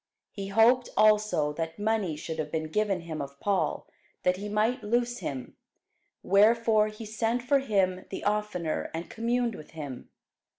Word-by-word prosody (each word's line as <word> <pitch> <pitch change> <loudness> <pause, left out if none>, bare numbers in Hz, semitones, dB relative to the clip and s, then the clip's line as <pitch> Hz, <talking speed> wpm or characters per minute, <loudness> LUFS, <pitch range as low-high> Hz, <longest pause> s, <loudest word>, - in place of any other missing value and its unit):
He 195 -2 -6
hoped 230 +5 +4
also 210 -8 +4
that 165 +1 -4
money 205 -6 0
should 160 +1 -6
have 155 - -3
been 155 -1 -3
given 205 -3 +1
him 160 -3 -5
of 140 0 -8
Paul, 200 -2 0 0.4
that 180 0 +2
he 205 +2 -5
might 220 +5 +1
loose 240 +3 0
him: 130 -3 -5 0.7
wherefore 215 +2 +4
he 215 +1 -8
sent 225 +3 -1
for 275 +3 +3
him 190 -7 0
the - - -6
oftener, 205 -6 -1
and 165 +1 -6
communed 235 +1 0
with 155 - -11
him. 140 -5 -7
210 Hz, 160 wpm, -28 LUFS, 165-225 Hz, 0.7 s, hoped